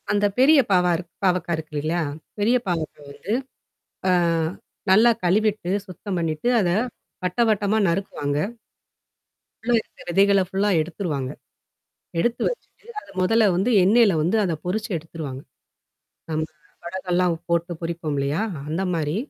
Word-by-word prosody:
அந்த 205 0 +2
பெரிய 285 +3 +7
பாவா 180 -1 +4
இருக் 175 -1 -9
பாவக்கா 180 -2 +1
இருக்கு 155 -1 -8
இல்லையா? 165 +3 0 0.4
பெரிய 230 +5 +4
பாவக்கா 165 -4 -3
வந்து. 195 +8 -4 0.8
அ - - +4 0.8
நல்லா 220 +5 +7
கழுவிட்டு, 205 0 +1 0.2
சுத்தம் 185 +1 -5
பண்ணிட்டு 165 +6 -1
அத 180 -4 +1 0.5
வட்டவட்டமா 210 +2 +2
நறுக்குவாங்க. 170 -5 -1 1.3
உல்லற 240 +1 +3
இருக்குற - - -17
விதைகள்ல 200 +1 +4
ஃபுல்லா 195 +2 0
எடுத்துருவாங்க. 155 -5 -3 0.9
எடுத்து 240 +6 0
வச்சுட்டு 470 -3 -9
அது - - -17
முதல்ல 225 +5 +4
வந்து 195 +7 +1
எண்ணெயில 210 0 +5
வந்து 180 +8 +1
அத 175 -4 0
பொரிச்சு 215 +5 -2
எடுத்துருவாங்க. 150 -4 -7 0.9
ஆமா. 155 0 0 0.4
வடகம்லாம் 180 0 0 0.2
போட்டு 170 +1 +1
பொரிப்போம் 165 -3 -3
இல்லையா? 140 +7 0 0.3
அந்த 165 +5 -1
மாரி? 155 0 -1
180 Hz, 125 wpm, -23 LUFS, 165-205 Hz, 1.3 s, பெரிய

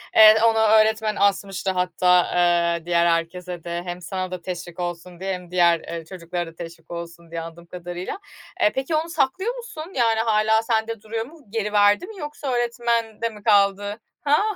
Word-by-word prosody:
Eee, 215 0 +9
onu 225 -1 +4
öğretmen 220 0 +3
asmıştı. 195 -1 +1
Hatta, 180 0 +3 0.2
ııı, 170 -1 +2
diğer 170 -1 +2
herkese 170 +1 -1
de 170 0 -4
hem 175 0 -5
sana 185 0 -4
da 185 -1 -5
teşvik 175 -1 -7
olsun 175 0 -5
diye 190 +1 -2
hem 180 -1 -8
diğer, 170 -2 +2
ııı, 165 -1 -6
çocuklara 175 0 -5
da - - -25
teşvik 165 -1 -10
olsun 170 -1 -8
diye, 165 - -3
anladığım 165 +1 -10
kadarıyla. 175 - -6 0.4
Eee, 315 - +5
peki 270 +4 -1
onu 325 +2 -1
saklıyor 375 - 0
musun? 385 -8 -8
Yani, 230 -3 +2
hâlâ 220 0 +3
sende 225 -1 -1
duruyor 225 +1 -4
mu, 320 +6 -15
geri 210 -1 -2
verdi 205 - +4
mi 425 -3 -10
yoksa 295 -3 -5
öğretmende 235 -2 -1
mi 210 -2 -13
kaldı? 205 0 +2 0.2
Ha. 295 +3 +3
195 Hz, 175 wpm, -23 LUFS, 175-225 Hz, 0.4 s, Eee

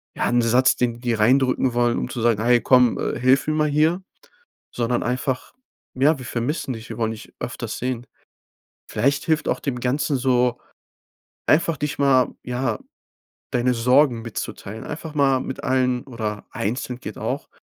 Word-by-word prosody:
ja - - 0
'n 120 0 +3
Satz, 120 +3 +4
den 120 -1 0
die - - -14
dir 120 -3 -1
reindrücken 130 +2 +3
wollen, 120 0 +2
um - - -3
zu 120 - -4
sagen: 115 -2 +2
„Hey 120 0 +4
komm, 125 -2 +4
äh, - - -2
hilf 130 +2 +4
mir 155 - +1
mal 155 0 +2
hier“, 160 +5 +2 0.7
sondern 120 0 0
einfach: 130 - -2 0.4
„Ja, 140 +4 +3
wir 130 - -8
vermissen 130 +3 -2
dich, 115 0 -10
wir 115 - -6
wollen 110 -1 0
dich 110 - -11
öfters - - -5
sehen.“ 125 -1 -3 0.9
Vielleicht 140 +6 +1
hilft 160 -2 +1
auch - - 0
dem 130 -4 -3
Ganzen 140 +3 0
so, 125 -1 +2 0.9
einfach, 165 +1 +3
dich 150 0 -3
mal 135 -3 +3
ja, 125 -2 -2 0.7
deine 125 0 +2
Sorgen 125 +1 +3
mitzuteilen, 110 -1 -6
einfach 155 +1 -6
mal 135 -2 +3
mit 130 - -6
allen 125 -1 +1
oder 110 -5 -5
einzeln 125 +3 -3
geht - - -7
auch, - - -3
125 Hz, 170 wpm, -22 LUFS, 120-135 Hz, 0.9 s, Satz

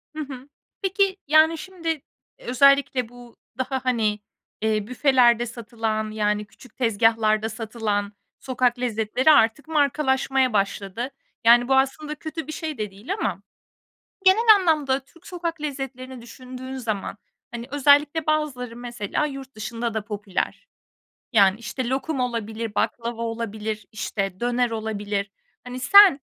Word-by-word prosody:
Hı - - -6
hı. 270 -1 -9 0.3
Peki, 390 0 +1
yani, 315 +2 +5
şimdi, 330 -3 -4 0.4
özellikle 270 -1 +3
bu 245 -1 -15 0.2
daha, 260 0 -3
hani, 220 -4 +1 0.4
eee, 215 -1 0
büfelerde 250 -2 +3
satılan, 225 -2 -3
yani, 210 -1 0
küçük 230 +3 -18
tezgâhlarda 225 -2 +2
satılan 215 -2 -3 0.3
sokak 250 -1 0
lezzetleri 245 +4 +2
artık 280 +2 +3
markalaşmaya 270 -4 +1
başladı. 200 +4 -2 0.3
Yani, 240 +1 +6
bu 265 - +3
aslında 275 +3 0
kötü 315 0 -6
bir - - -5
şey 310 -2 -5
de 210 -2 -4
değil 210 - -5
ama 195 - -2 0.8
genel 435 +4 +7
anlamda 300 -7 +1
Türk 335 +5 -21
sokak 335 -3 -4
lezzetlerini 265 -3 -6
düşündüğün 255 +2 -9
zaman, 215 -6 -3 0.3
hani, 235 0 -7
özellikle 290 +2 +3
bazıları 280 -6 -1
mesela 240 +2 -3
yurt 270 -2 -8
dışında 230 +1 -4
da 220 -2 -2
popüler. 210 - -4 0.7
Yani, 200 -1 +5
işte, 240 +2 -4
lokum 270 +2 -2
olabilir, 230 -3 -3
baklava 235 0 -2
olabilir, 220 -2 -4
işte, 195 -3 -3
döner 245 0 +1
olabilir. 210 -2 -3 0.3
Hani, 250 +1 -7
sen, 400 0 +7
245 Hz, 130 wpm, -24 LUFS, 220-280 Hz, 0.8 s, genel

